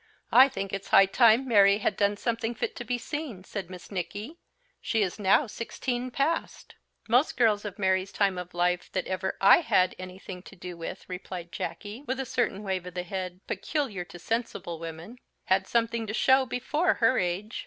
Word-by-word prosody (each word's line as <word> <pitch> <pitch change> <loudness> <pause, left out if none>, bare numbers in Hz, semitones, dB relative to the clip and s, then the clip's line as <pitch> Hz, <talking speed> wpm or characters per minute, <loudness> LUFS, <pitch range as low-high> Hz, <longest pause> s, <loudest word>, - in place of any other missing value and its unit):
"I 265 +2 +8
think 195 -6 -5
it's 195 0 -4
high 195 - +7
time 230 +5 +4
Mary 200 -4 +6
had 210 - 0
done 205 0 +1
something 230 +1 -2
fit - - -3
to - - -4
be 245 +1 -1
seen," 255 - -5
said 190 -2 -6
Miss 185 +1 -11
Nicky; 205 - -5 0.4
"she 220 -3 +1
is 190 +2 -3
now 200 +8 +4
sixteen 245 +2 -4
past." 285 +6 -2 0.3
"Most 245 +6 +3
girls 215 -3 +3
of 200 -2 -6
Mary's 190 -1 +1
time 195 -3 +1
of 180 0 -8
life 180 0 0
that 185 - -1
ever 190 0 -3
I 195 - +8
had 185 - +2
anything 185 0 -8
to 195 - -14
do 180 -1 -8
with," 170 +3 -7
replied 180 -1 -7
Jacky, 215 +6 -6
with 260 +1 -2
a 265 - -2
certain 225 -5 -1
wave 190 -3 -2
of 180 - -9
the 180 - -2
head, 185 0 -5
peculiar 260 - -2
to 175 - -11
sensible 225 -5 -3
women, 165 +8 -8 0.3
"had 190 +1 +2
something 230 -1 0
to 215 - -3
show 265 +1 +4
before 295 +8 0
her 240 +2 +3
age. 185 +5 -2
205 Hz, 190 wpm, -28 LUFS, 185-240 Hz, 0.4 s, I